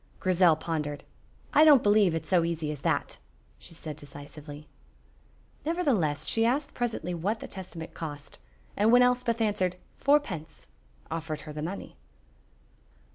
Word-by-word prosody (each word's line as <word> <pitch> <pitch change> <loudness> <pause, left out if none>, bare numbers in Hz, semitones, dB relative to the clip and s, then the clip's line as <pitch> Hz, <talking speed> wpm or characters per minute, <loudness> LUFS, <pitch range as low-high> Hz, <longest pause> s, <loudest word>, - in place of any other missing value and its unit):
Grizel 180 -3 +4
pondered. 150 -3 -3 0.5
"I 300 - +7
don't 295 -5 +7
believe 205 -4 +4
it 165 - -2
is - - -14
so 180 -3 +4
easy 165 -2 -2
as 150 - -6
that," - - -1 0.4
she 165 - -10
said, 155 -2 -7
decisively. 145 0 -10 1.0
Nevertheless 225 - 0
she 225 - +2
asked 275 +5 +1
presently 225 -8 -2
what 195 +7 -1
the - - -7
Testament 175 -4 -8
cost, 145 -3 -7 0.4
and 210 +2 +3
when 245 +1 +7
Elspeth 250 -2 +2
answered 190 -4 +1 0.2
"Fourpence," 200 - 0 0.5
offered 160 -1 -4
her 150 - -8
the 150 - -5
money. 180 +6 -6
175 Hz, 140 wpm, -28 LUFS, 155-230 Hz, 1.0 s, I